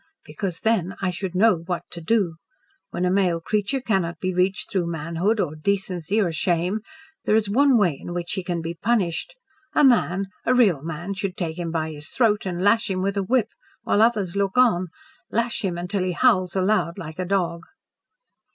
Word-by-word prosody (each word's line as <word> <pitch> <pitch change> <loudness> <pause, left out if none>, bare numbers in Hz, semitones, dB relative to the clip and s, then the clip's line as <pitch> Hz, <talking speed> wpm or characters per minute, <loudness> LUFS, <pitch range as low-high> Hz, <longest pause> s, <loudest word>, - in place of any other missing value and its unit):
"Because, 185 -6 -4
then 195 -5 +1
I 185 -2 0
should 180 0 -5
know 210 0 +5
what 170 +1 -4
to 170 - -7
do. 180 -3 +1 0.5
When 180 - -2
a 180 - +2
male 185 -3 +2
creature 210 +9 -1
cannot 190 -8 -1
be 185 0 -1
reached 185 +2 0
through 180 -3 0
manhood 170 +7 -1
or 155 -6 -1
decency 190 +2 -1
or 185 -5 +1
shame, 175 +5 0 0.5
there 215 - +3
is 220 -2 +2
one 265 +5 +4
way 175 -10 +2
in - - -7
which 175 0 -3
he 190 - -2
can 175 -1 -2
be 165 +1 -3
punished. 200 - -1 0.4
A 300 - +5
man 195 - +3 0.2
a 255 - +2
real 200 - +4
man 170 +5 -5
should 195 -1 -4
take 165 -1 -3
him 170 -1 -3
by 160 -1 -2
his 150 +2 -9
throat 215 -5 +1
and 180 0 -3
lash 225 +3 +3
him 185 -1 -1
with 200 +1 -1
a 200 - +1
whip 225 +2 +1 0.3
while 205 - +2
others 210 -6 +2
look 200 +2 0
on 215 -8 +4 0.4
lash 230 +1 -1
him 180 -3 -1
until 180 +3 -2
he 185 -1 -1
howls 180 +1 +2
aloud 190 -2 +1
like 160 -2 -8
a - - 0
dog." 175 -3 0
185 Hz, 195 wpm, -23 LUFS, 170-210 Hz, 0.5 s, know